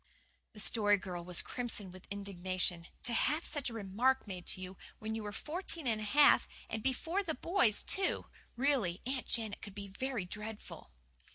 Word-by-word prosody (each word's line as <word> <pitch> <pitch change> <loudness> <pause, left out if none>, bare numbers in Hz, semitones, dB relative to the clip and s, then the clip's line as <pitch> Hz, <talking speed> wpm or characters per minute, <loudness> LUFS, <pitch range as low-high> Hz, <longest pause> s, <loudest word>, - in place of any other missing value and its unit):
The 215 - -10
Story 205 0 +4
Girl 180 -3 -5
was 180 0 +2
crimson 225 -6 -3
with 185 0 -13
indignation. 185 -3 -1 0.2
To 240 - +2
have 300 +7 +2
such 290 -4 0
a - - -8
remark 225 +6 +1
made 185 -4 -7
to - - 0
you 185 0 -6 0.2
when 220 0 -4
you 220 - -3
were 210 -1 -4
fourteen 330 - -1
and 220 -3 +1
a - - -3
half 285 +7 +6 0.2
and 220 - -3
before 320 - 0
the 330 -6 -3
boys, 255 - +3
too! 385 -1 +3 0.3
Really, 240 -9 +1
Aunt 260 0 -2
Janet 220 -3 -1
could 200 -1 -9
be 200 -1 -6
very 235 +1 -3
dreadful. 210 +3 -6
215 Hz, 180 wpm, -34 LUFS, 195-265 Hz, 0.3 s, half